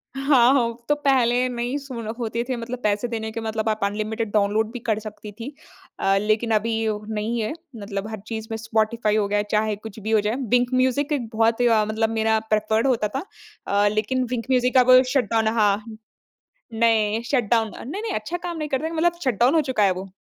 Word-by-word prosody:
हाँ, 270 -2 +4
हो 235 -3 0
तो 295 - +4
पहले 255 -4 +2
नहीं 245 +2 -2
सु 275 -2 -9 0.3
होते 235 0 -2
थे 255 - 0
मतलब 235 +1 -5
पैसे 210 +3 +1
देने 220 -2 -4
के 225 - -5
मतलब 220 0 -2
आप 215 0 -1
अनलिमिटेड 215 +2 -2
डाउनलोड 215 +1 +1
भी 245 - -6
कर 220 -2 -1
सकती 215 -1 -9
थी 230 +7 -8 0.5
अ, 195 0 +2
लेकिन 215 +3 0
अभी 225 +2 0 0.4
नहीं 220 +2 -2
है, 215 - -2 0.2
मतलब 200 -1 -5
हर 220 -1 -6
चीज़ 220 -1 -5
में 225 - -2
स्पॉटिफाई 220 0 0
हो 210 -2 +1
गया 205 +1 +1
चाहे 215 0 +1
कुछ 215 +1 -10
भी 215 +1 -4
हो 220 -1 +4
जाए। 210 +3 -1 0.2
विंक 245 +1 +1
म्यूजिक 260 +3 +1
एक 255 -6 -2
बहुत 225 +1 +2
अ, 225 -3 +4
मतलब 220 +1 0
मेरा 220 0 +2
प्रिफर्ड 220 +3 +1
होता 235 -5 +1
था - - -3 0.4
अ, 205 +1 +3
लेकिन 215 +5 0
विंक 235 -2 -2
म्यूजिक 250 0 +3
अब 255 0 +7
शट 270 -3 +1
डाउन 225 -1 +2
हाँ। 210 +1 +1 0.8
नहीं 225 -1 +2
शट 255 -4 +2
डाउन 225 -2 +2
अ - - -9
नहीं, 345 - -5
नहीं, 450 -3 -3
अच्छा 215 +11 -3
काम 350 -1 -5
नहीं 305 -1 -3
करते 270 +1 -1
थे - - -3
मतलब 335 +1 +2
शट 250 -7 0
डाउन 250 +5 +4
हो 320 - +5
चुका 235 -5 +1
है 195 - +4
वो। 185 +1 -7
225 Hz, 215 wpm, -23 LUFS, 215-250 Hz, 0.8 s, अब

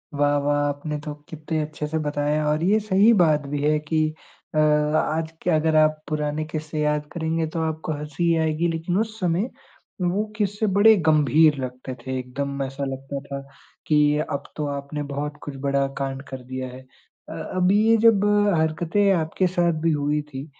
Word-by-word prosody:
वाह, 145 0 +2
वाह! 145 0 +1
आपने 145 +1 -4
तो 150 0 -5 0.2
कितने 155 0 -3
अच्छे 150 0 -4
से 160 +1 -2
बताया 150 0 0
और 150 +2 +1
ये 205 +5 +4
सही 210 +1 +4
बात 150 -3 +3
भी 145 0 -3
है 150 +1 +3
कि 155 +1 0 0.5
अ, - - +1
आज 155 +1 +2
के - - -1
अगर 160 0 +2
आप 155 0 +4
पुराने 150 0 -2
क़िस्से 155 0 -5
याद 150 0 0
करेंगे 160 0 -1
तो 165 - -2
आपको 160 0 -4
हँसी 150 +2 -5
ही 170 -1 +3
आएगी 160 +1 +1
लेकिन 165 +2 -2
उस 220 0 -3
समय 180 +5 0 0.5
वो 180 +4 +1
क़िस्से 205 +1 0
बड़े 220 +2 +7
गंभीर 155 0 +5
लगते 130 0 -6
थे। 130 +1 -5
एकदम 140 +2 -4
ऐसा 135 +1 -5
लगता 135 +1 -5
था 140 -1 -5 0.5
कि 150 -1 +4
अब 140 - -3
तो 150 - -2
आपने 140 +1 -5
बहुत 145 +1 -4
कुछ 145 - -6
बड़ा 140 0 +1
काँड 135 -1 -3
कर 130 -1 -7
दिया 130 +1 -5
है। 130 +1 -10 0.5
अ, - - -6
अब 185 0 0
ये 220 +3 +4
जब 210 -3 +5 0.3
हरकतें 170 +6 +1
आपके 170 +2 0
साथ 170 -3 0
भी 165 0 +2
हुई 150 0 0
थी 145 -2 -8
155 Hz, 185 wpm, -23 LUFS, 145-165 Hz, 0.5 s, बड़े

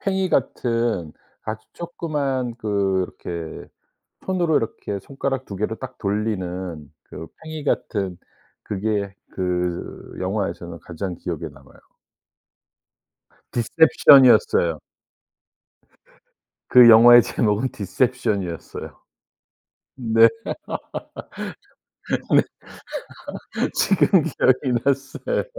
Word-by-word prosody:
팽이 190 -1 0
같은 115 - 0 0.3
아주 110 0 -6
쪼끄만 145 -8 -3
그렇게 95 -6 -3 0.6
손으로 175 -4 +1
이렇게 105 -2 -4
손가락 135 +2 -3
2 100 - -7
개로 105 +3 -2
딱 130 +1 -8
돌리는 95 -7 -3
그 80 - -9 0.2
팽이 155 -1 -7
같은 95 -9 -1 0.5
그게 100 -1 -2 0.2
그 90 -1 -3
영화에서는 95 -3 -3
가장 90 +2 -5
기억에 85 -2 -5
남아요. 70 0 -19 1.7
디셉션이었어요. 120 - +5 1.9
그 125 -2 +9
영화의 120 +2 +9
제목은 110 +4 0
디셉션이었어요. 100 -4 -2 1.0
네. 115 -2 +5 1.8
네. - - +3 1.3
지금 190 -2 +3
기억이 130 -4 +1
났어요. 140 - -1
110 Hz, 185 characters per minute, -22 LUFS, 95-130 Hz, 1.9 s, 그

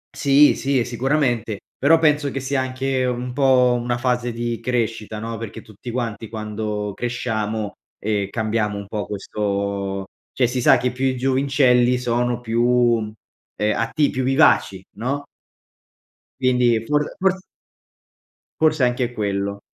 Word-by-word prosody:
Sì, 145 0 +5
sì, 135 0 0
e 120 - 0
sicuramente. 120 -4 0 0.2
Però, 160 +4 +5
penso 150 -3 +2
che 135 - -3
sia 130 0 -1
anche 130 0 -1
un 125 0 -3
po' 125 -2 +4
una 120 0 -1
fase 125 -1 0
di 120 0 -3
crescita, 115 -3 -2
no, 115 +1 -5
perché 115 -1 -7
tutti 110 +3 -10
quanti 115 -2 -3
quando 105 -1 -4
cresciamo, 110 -3 -2 0.3
ehm, 100 -2 -1
cambiamo 110 -2 -1
un 100 -1 -7
po' 105 0 -3
questo 100 -1 -3 0.3
cioè 125 - +2
si 125 +2 -2
sa, - - +6
che 125 0 -1
più 130 +1 -2
i 130 - 0
giovincelli 130 -1 +3
sono 120 0 0
più, 115 0 0 0.4
mhmm, 105 -1 -5 0.4
ehm, 105 0 +1
atti 130 +6 +1
più 130 - -2
vivaci, 130 - +3
no, 135 +6 -3 1.1
quindi, 125 -3 +2
for 150 +3 +2 0.2
fors 190 0 +2 1.2
forse 155 -3 +3
è - - +6
anche 125 0 -1
quello. 100 -2 -2
120 Hz, 145 wpm, -21 LUFS, 110-130 Hz, 1.2 s, sa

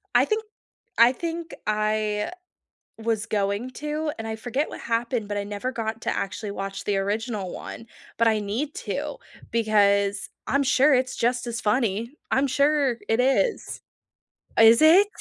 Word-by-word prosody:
I - - +6
think 435 0 -1 0.5
I 235 +2 +7
think 335 +3 -5
I 215 +1 0 0.7
was 225 -1 -1
going 205 +3 -1
to 300 +2 -3
and 225 - -5
I 220 - -3
forget 250 +6 -2
what - - -8
happened 230 -1 -1
but 205 0 -3
I 200 - -1
never 205 +5 -4
got 225 -1 -4
to - - -1
actually 200 +2 -3
watch 195 -1 -5
the 200 -1 0
original 205 0 -2
one, 230 - -8 0.3
but 230 - +4
I 220 -1 +3
need 225 +9 -3
to - - -3 0.4
because 200 -3 +2 0.2
I'm 280 +1 +2
sure 275 +2 +4
it's 255 0 +1
just 245 +1 0
as 235 -1 -3
funny. 220 0 0 0.2
I'm 270 +2 +3
sure 280 -1 +2
it 225 +2 +2
is. 270 - +1 0.8
Is 225 +2 +7
it? 345 +6 +7
230 Hz, 160 wpm, -25 LUFS, 210-260 Hz, 0.8 s, I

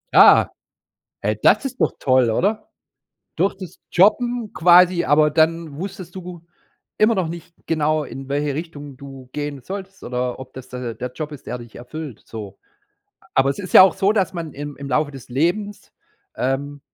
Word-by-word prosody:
Ah, - - +7 0.7
hey, - - -1
das - - +4
ist 260 -1 -5
doch - - +2
toll, 130 -3 +3
oder? 210 - 0 0.7
Durch 195 - +1
das 185 -2 -10
Jobben 230 +4 +3
quasi 175 +2 +5
aber 150 +1 +4
dann 160 -1 +1
wusstest 185 -1 -7
du 180 -2 -8 0.6
immer 215 +2 +4
noch 185 -5 -1
nicht 170 0 -9
genau, 155 -1 +1
in 135 -1 -8
welche 145 0 -1
Richtung 145 -4 -7
du 135 -2 -11
gehen 145 -2 -4
solltest, 195 +4 -8
oder 125 +1 -3
ob 130 0 -10
das 130 -1 -10
d 125 - -7
der 120 -2 -4
der 125 +2 -6
Job 150 +3 -5
ist, 145 -3 -11
der 125 - -4
dich 120 -2 -12
erfüllt, 135 0 -8
so. 105 -4 -8 0.8
Aber 135 +1 +3
es 140 - -2
ist 190 -3 -7
ja - - +11
auch 185 -2 +6
so, 195 +1 +2
dass 195 -4 0
man 165 -4 -5
im 145 0 -7
im 140 - -7
Laufe 145 +3 +1
des 135 -4 -11
Lebens, 175 +10 -1 0.4
ähm, 140 +3 -2
155 Hz, 180 wpm, -21 LUFS, 135-180 Hz, 0.8 s, ja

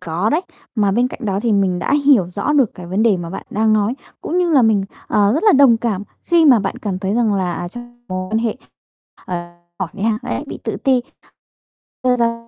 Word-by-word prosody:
có 180 +4 -1
đấy. 315 - +2 0.3
Mà 205 -4 +2
bên 240 +4 +2
cạnh - - -10
đó 195 -2 0
thì 235 - +1
mình 190 -3 +1
đã 275 - 0
hiểu 250 -11 +5
rõ 200 +10 -1
được 275 -7 +2
cái 180 - -9
vấn 190 +5 0
đề 220 -4 +4
mà 170 -1 -6
bạn 190 - -7
đang 220 +1 +2
nói, 215 +2 +1 0.3
cũng 345 - -2
như 355 -1 +1
là 280 -5 +5
mình, 215 -4 +3 0.2
ờ, 205 -1 +2
rất 310 - 0
là 425 - +6
đồng 270 -6 +6
cảm 225 -4 -2 0.2
khi 340 -1 +4
mà 255 -5 +7
bạn 195 -2 -3
cảm 195 -4 -3
thấy 195 +2 -2
rằng 225 -3 +2
là, 185 -2 -1
à, 175 +1 -4
trong 240 +3 -12
mối 185 0 -4
quan 220 - +2
hệ, 225 0 -1 0.7
ờ, 180 - -3 0.4
hỏi 190 - -2
đi 205 - -7
ha, 220 0 +1
đấy - - -3
bị - - -7
tự - - -2
ti, 260 -2 +4 1.0
quay 255 -1 +2
ra 230 -1 -1
220 Hz, 240 wpm, -18 LUFS, 195-245 Hz, 1.0 s, mà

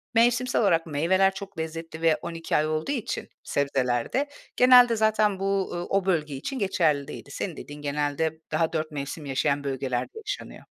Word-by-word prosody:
mevsimsel 240 +2 +3
olarak 170 -6 +3
meyveler 180 +6 +2
çok 195 -2 -8
lezzetli 160 0 -5
ve 165 -1 +4
12 165 -1 -3
ay 155 - +2
olduğu 155 - -1
için 250 -7 -3
sebzeler 125 -4 0
de 280 +2 +1 0.3
genelde 250 -2 +7
zaten 215 -2 +2
bu, 195 0 0
ııı, 175 0 -3
o 195 -1 +1
bölge 155 -6 0
için 255 - -4
geçerli 160 -8 +1
değildi. 140 - -9
Senin 170 +3 -4
dediğin 145 0 -9
genelde 150 +2 -1
daha 165 -1 +1
4 155 -1 -2
mevsim 145 +1 -5
yaşayan 140 +1 0
bölgelerde 130 -3 -2 0.2
yaşanıyor. 415 - -6
165 Hz, 165 wpm, -26 LUFS, 145-195 Hz, 0.3 s, genelde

